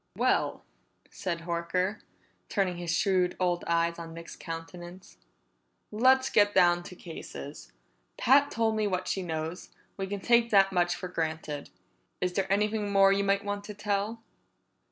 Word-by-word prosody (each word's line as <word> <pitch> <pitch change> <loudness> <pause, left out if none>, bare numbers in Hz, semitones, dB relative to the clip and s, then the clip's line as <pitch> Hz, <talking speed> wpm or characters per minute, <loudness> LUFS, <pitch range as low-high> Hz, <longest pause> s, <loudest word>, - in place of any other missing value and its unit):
"Well," - - +1 0.5
said 170 -3 -4
Horker, 175 +4 -1 0.5
turning 190 -4 0
his 175 -1 -5
shrewd 180 +1 +1
old 175 -1 0
eyes 170 0 +1
on 165 -1 -8
Nick's 170 0 -9
countenance, 175 - -9 0.7
"let's 260 +4 +4
get 205 -1 +4
down 175 -2 +5
to 185 - -9
cases. 110 - -9 0.5
Pat's 275 +3 +4
told 225 -1 +1
me 215 -1 +1
what 185 -2 -2
she 190 - -1
knows; 160 0 -4 0.3
we 195 -1 -3
can 200 +1 -4
take 235 +2 +3
that 195 -2 +5
much 175 -1 +2
for 185 - -6
granted. 160 -4 -4 0.5
Is 180 0 -1
there 195 0 -1
anything 210 0 +1
more 195 0 +6
you 200 0 +1
might 200 +1 +1
want 205 0 -3
to 210 - -8
tell?" 210 +2 -2
185 Hz, 155 wpm, -29 LUFS, 170-205 Hz, 0.7 s, more